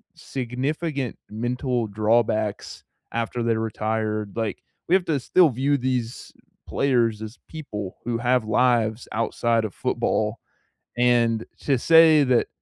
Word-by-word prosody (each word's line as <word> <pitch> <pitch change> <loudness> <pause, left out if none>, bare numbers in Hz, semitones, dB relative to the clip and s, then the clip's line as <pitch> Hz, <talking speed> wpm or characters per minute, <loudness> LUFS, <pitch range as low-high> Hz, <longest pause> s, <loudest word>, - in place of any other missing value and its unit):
significant 135 +2 -3
mental 120 +1 -2
drawbacks 110 0 0 0.3
after 115 +1 -2
they 115 -1 +1
retired, 110 -1 -2
like, 115 -2 -3 0.3
we 180 - +4
have 190 - +1
to 150 -4 0
still 170 +5 +4
view 135 +4 +1
these 125 -2 -3 0.4
players 120 -5 +1
as 110 +2 -8
people 105 - -7
who 120 -1 -2
have 125 0 +1
lives 115 -1 +1
outside 115 0 0
of 105 - -6
football, - - -1 0.6
and 120 -2 +2 0.2
to 135 -3 +1
say 160 +1 +6
that 125 -3 +2
120 Hz, 125 wpm, -24 LUFS, 110-130 Hz, 0.6 s, say